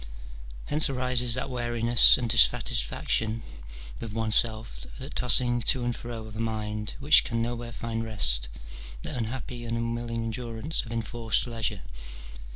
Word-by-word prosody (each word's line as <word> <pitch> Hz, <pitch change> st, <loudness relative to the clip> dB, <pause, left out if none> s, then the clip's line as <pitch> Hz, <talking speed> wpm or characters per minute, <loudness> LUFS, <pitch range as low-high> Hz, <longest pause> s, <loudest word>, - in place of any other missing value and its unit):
Hence 150 Hz, 0 st, +3 dB
arises 125 Hz, -2 st, +1 dB
that 130 Hz, -, -2 dB
weariness 120 Hz, -2 st, +5 dB
and 120 Hz, -, -2 dB
dissatisfaction 110 Hz, -, +1 dB, 0.6 s
with 115 Hz, -2 st, -7 dB
one 110 Hz, 0 st, -2 dB
self, 110 Hz, +1 st, 0 dB
that 130 Hz, +1 st, -8 dB
tossing 120 Hz, 0 st, +2 dB
to 125 Hz, +2 st, +2 dB
and 120 Hz, 0 st, -1 dB
fro 115 Hz, -2 st, -7 dB
of 110 Hz, 0 st, -11 dB
a -, -, -6 dB
mind 105 Hz, -1 st, -3 dB
which 145 Hz, +2 st, +6 dB
can 115 Hz, -1 st, -3 dB
nowhere 120 Hz, 0 st, -3 dB
find 115 Hz, 0 st, -4 dB
rest, -, -, 0 dB, 0.5 s
that -, -, -5 dB
nnhappy 120 Hz, +1 st, -5 dB
and 115 Hz, 0 st, -2 dB
unwilling 115 Hz, 0 st, -3 dB
endurance 115 Hz, +5 st, -3 dB
of 115 Hz, -, -10 dB
en 115 Hz, -1 st, -2 dB
forced 115 Hz, 0 st, 0 dB
leisure. 115 Hz, -4 st, -3 dB
115 Hz, 150 wpm, -27 LUFS, 110-120 Hz, 0.6 s, which